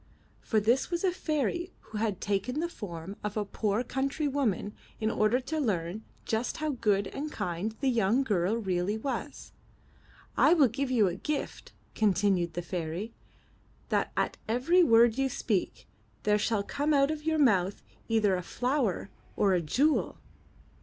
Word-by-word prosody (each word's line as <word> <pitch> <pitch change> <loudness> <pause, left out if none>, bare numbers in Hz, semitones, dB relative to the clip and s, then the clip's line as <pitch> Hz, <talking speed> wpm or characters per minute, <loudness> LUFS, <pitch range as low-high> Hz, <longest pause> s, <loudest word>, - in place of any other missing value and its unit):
For 220 - +1
this 235 +5 +2
was 345 0 -2
a 375 - +3
fairy 345 +2 -2
who 215 - -7
had 210 -4 -1
taken 205 +8 -1
the 340 - 0
form 190 - -7
of 210 0 -3
a 210 - 0
poor 210 +3 -1
country 275 +4 -1
woman 240 -8 -1 0.3
in 220 0 0
order 215 +4 +2
to 310 +5 -3
learn 200 - -1 0.2
just 225 +2 -1
how 310 -1 -1
good 210 -6 +1
and 300 +8 -5
kind 180 - -3
the 275 - +1
young 235 +1 +3
girl 205 -3 +1
really 190 -1 -1
was. 265 +5 -5 0.8
I 345 - +5
will 285 -7 +5
give 270 +4 -2
you 235 -5 +4
for 185 - +1
a - - -5
gift," 300 +7 -4 0.2
continued 195 -4 +1
the 175 - -3
fairy, 175 +5 -4 0.8
*'that - - 0
at - - 0
every 260 +11 +3
word 230 -2 +5
you 270 0 +2
speak, 210 -6 -2 0.4
there 210 0 +3
shall 210 -1 0
come 290 +7 0
out 275 +1 +4
of 305 -1 -5
your 320 0 +1
mouth 200 -9 +2 0.2
either 215 -4 +3
a 180 - -2
flower 245 - -1 0.2
or 195 -2 +3
a 180 - +2
jewel." 280 - +1
225 Hz, 165 wpm, -29 LUFS, 200-275 Hz, 0.8 s, I